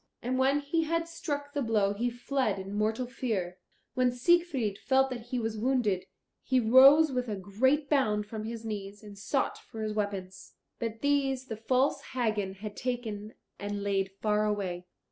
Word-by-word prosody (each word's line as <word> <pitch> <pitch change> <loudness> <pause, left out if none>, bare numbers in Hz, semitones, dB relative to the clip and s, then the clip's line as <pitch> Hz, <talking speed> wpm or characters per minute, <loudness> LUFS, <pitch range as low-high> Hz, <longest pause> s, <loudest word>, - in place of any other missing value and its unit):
And 255 +2 -1
when 275 +2 +3
he 320 +3 0
had 330 +1 0
struck 285 -4 -4
the 285 - -1
blow 215 -4 +2
he 235 +4 -1
fled 245 -2 -1
in 195 +1 -6
mortal 220 +4 0
fear. 205 -8 -3 0.3
When 255 -1 +2
Siegfried 260 - +1
felt 265 0 +2
that 240 -2 -6
he 255 - -2
was 225 -2 -2
wounded, 230 -6 +1 0.3
he 260 -1 +2
rose 270 +6 +7
with 250 -2 -2
a 210 - -1
great 260 +10 +1
bound 215 -8 +2
from 215 0 -6
his 225 0 -6
knees 205 -1 -6
and 205 -1 -10
sought 235 +7 -1
for 220 -1 -8
his 215 0 -2
weapons. 195 -3 -4 0.2
But 225 -1 -4
these 275 -2 +1
the 225 -4 -6
false 255 +5 +1
Hagen 215 -6 -1
had 205 +1 -7
taken 225 -4 -4 0.2
and 205 0 -4
laid 195 -1 0
far 210 0 +2
away. 185 -4 -2
225 Hz, 175 wpm, -30 LUFS, 205-265 Hz, 0.3 s, rose